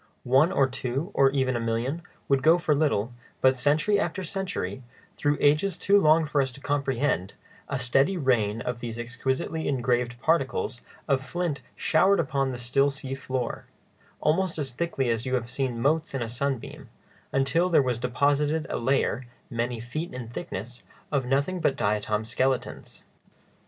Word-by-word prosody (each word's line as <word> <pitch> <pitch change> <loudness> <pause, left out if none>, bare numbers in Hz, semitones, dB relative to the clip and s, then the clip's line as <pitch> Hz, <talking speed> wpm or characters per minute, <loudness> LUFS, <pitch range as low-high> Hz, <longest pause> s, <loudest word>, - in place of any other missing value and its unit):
One 135 +7 +4
or 135 - +3
two, 135 +7 -3
or 135 -1 +5
even 130 -2 0
a - - 0
million, 115 +7 -1 0.3
would 135 -1 +3
go 160 +5 +6
for 165 -3 +1
little; 140 -6 +1 0.3
but 130 0 +4
century 155 +10 +2
after 190 -2 -2
century, 180 - -3 0.3
through 145 0 +1
ages 160 +6 +3
too 200 +3 +4
long 155 0 +5
for 145 -1 +1
us 130 -1 -1
to 140 - -10
comprehend, 140 -8 -1 0.3
a 140 - -1
steady 135 +8 +2
rain 115 -7 +1
of 125 -1 -3
these 115 -1 -5
exquisitely 130 +6 -2
engraved 125 -2 0
particles 135 -4 0 0.3
of 135 -2 +1
flint 175 -2 -2
showered 190 +5 +3
down 170 - +1
upon 135 -1 0
the 125 - -5
still 130 +4 +2
sea 135 -1 -6
floor, 130 -2 -3 0.6
almost 175 +3 +1
as 140 -4 -2
thickly 135 -1 -1
as 115 +2 -2
you 130 - +1
have 120 -1 -3
seen 130 -3 -2
motes 155 +4 +1
in 130 - -1
a - - -4
sunbeam, 130 +1 -4 0.4
until 165 +7 +2
there 170 - +5
was 125 -2 -1
deposited 145 +5 +1
a - - -1
layer, 125 -1 0 0.2
many 120 0 -2
feet 155 +9 -5
in 120 -3 -6
thickness, 120 +1 -6 0.3
of 135 -4 0
nothing 140 +8 +1
but 140 - +1
diatom 105 -2 0
skeletons. 130 +2 -2
135 Hz, 165 wpm, -26 LUFS, 120-150 Hz, 0.6 s, go